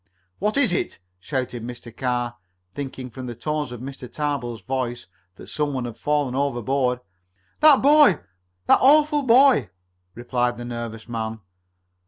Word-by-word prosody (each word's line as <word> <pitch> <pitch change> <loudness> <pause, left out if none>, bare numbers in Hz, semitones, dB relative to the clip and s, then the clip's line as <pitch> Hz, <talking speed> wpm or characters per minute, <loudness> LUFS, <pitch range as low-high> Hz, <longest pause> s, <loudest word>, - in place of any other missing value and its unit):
"What 210 +6 0
is 250 -10 +3
it?" - - -2 0.2
shouted 125 +1 -3
Mr. 120 -1 -9
Carr, 120 -2 -2 0.4
thinking 130 -1 -6
from 130 +1 -7
the 120 - -6
tones 150 +2 -3
of 120 -1 -8
Mr. 130 -2 -8
Tarbill's 135 -7 -3
voice 120 +2 -3 0.4
some 150 -1 -2
one 130 -2 -2
had 120 -2 -6
fallen 145 -2 0
overboard. 130 -1 0 0.6
"That 300 -4 +6
boy! 290 - +6 0.5
That - - +5
awful 295 +2 +5
boy!" 260 - +5 0.5
replied 120 0 -1
the 120 - -6
nervous 115 -2 -6
man. 110 -1 -4
130 Hz, 140 wpm, -23 LUFS, 120-150 Hz, 0.6 s, That